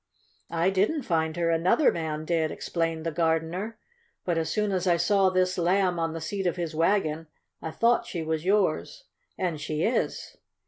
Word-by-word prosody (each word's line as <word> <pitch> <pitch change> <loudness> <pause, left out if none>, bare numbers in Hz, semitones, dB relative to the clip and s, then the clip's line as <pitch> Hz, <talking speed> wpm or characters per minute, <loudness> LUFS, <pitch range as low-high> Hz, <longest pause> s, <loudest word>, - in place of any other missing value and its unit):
"I 170 +3 +1
didn't 210 +11 +1
find 160 -4 0
her. 170 -1 +1
Another 175 - +3
man 155 -2 -4
did," 160 -1 +1
explained 165 -1 -3
the 165 - 0
gardener. 165 +6 -1 0.5
"But 170 -2 +1
as 160 0 -2
soon 210 +1 0
as 185 -1 -1
I 175 -1 +4
saw 190 +2 +3
this 185 0 +1
Lamb 180 0 +2
on 165 -1 -1
the 165 - -4
seat 195 +2 -2
of 175 - 0
his 170 -3 -4
wagon, 165 -2 +1 0.3
I 160 - -4
thought 235 +7 +2
she 175 -8 -4
was 160 0 -2
yours. 200 - 0 0.3
And 170 -5 -2
she 155 +2 -2
is!" 235 - -1
170 Hz, 180 wpm, -27 LUFS, 160-190 Hz, 0.5 s, I